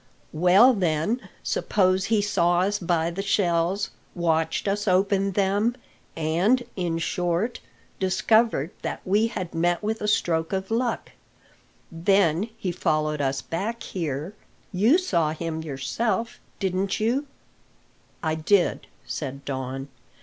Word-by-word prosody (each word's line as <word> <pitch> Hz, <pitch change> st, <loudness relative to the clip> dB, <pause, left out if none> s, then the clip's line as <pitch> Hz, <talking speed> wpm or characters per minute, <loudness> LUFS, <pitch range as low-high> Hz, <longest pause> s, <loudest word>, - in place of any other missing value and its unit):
"Well, 185 Hz, +10 st, +6 dB
then, 185 Hz, +4 st, -1 dB
suppose 185 Hz, -1 st, +1 dB
he 215 Hz, -1 st, +2 dB
saw 175 Hz, -3 st, +2 dB
us 205 Hz, +2 st, 0 dB
buy 170 Hz, -2 st, 0 dB
the 185 Hz, +3 st, -3 dB
shells, 190 Hz, -1 st, +1 dB, 0.2 s
watched 165 Hz, 0 st, 0 dB
us 205 Hz, +1 st, -1 dB
open 195 Hz, +1 st, +2 dB
them, 205 Hz, +5 st, +1 dB, 0.4 s
and, 175 Hz, +11 st, +2 dB
in 175 Hz, -3 st, -1 dB
short, 175 Hz, +6 st, -1 dB, 0.4 s
discovered 190 Hz, -, +2 dB
that -, -, -4 dB
we 210 Hz, +4 st, +3 dB
had 185 Hz, -6 st, -5 dB
met 175 Hz, +3 st, +1 dB
with 220 Hz, +1 st, -2 dB
a 210 Hz, -, -1 dB
stroke 165 Hz, -4 st, +1 dB
of 190 Hz, +2 st, -2 dB
luck. 235 Hz, 0 st, -1 dB, 0.8 s
Then 175 Hz, +2 st, +2 dB
he 190 Hz, -5 st, -2 dB
follows 155 Hz, -3 st, 0 dB
us 135 Hz, 0 st, -1 dB
back 210 Hz, +8 st, -3 dB
here 160 Hz, 0 st, -4 dB, 0.4 s
you 220 Hz, -, +4 dB
saw 170 Hz, -, +1 dB
him 160 Hz, 0 st, -4 dB
yourself, 160 Hz, -, -2 dB, 0.2 s
didn't 190 Hz, 0 st, -1 dB
you?" 250 Hz, +7 st, 0 dB, 1.0 s
"I 160 Hz, -1 st, +1 dB
did," 175 Hz, +4 st, +1 dB, 0.2 s
said 140 Hz, -2 st, -5 dB
Don. 135 Hz, 0 st, -4 dB
185 Hz, 125 wpm, -25 LUFS, 165-205 Hz, 1.0 s, Well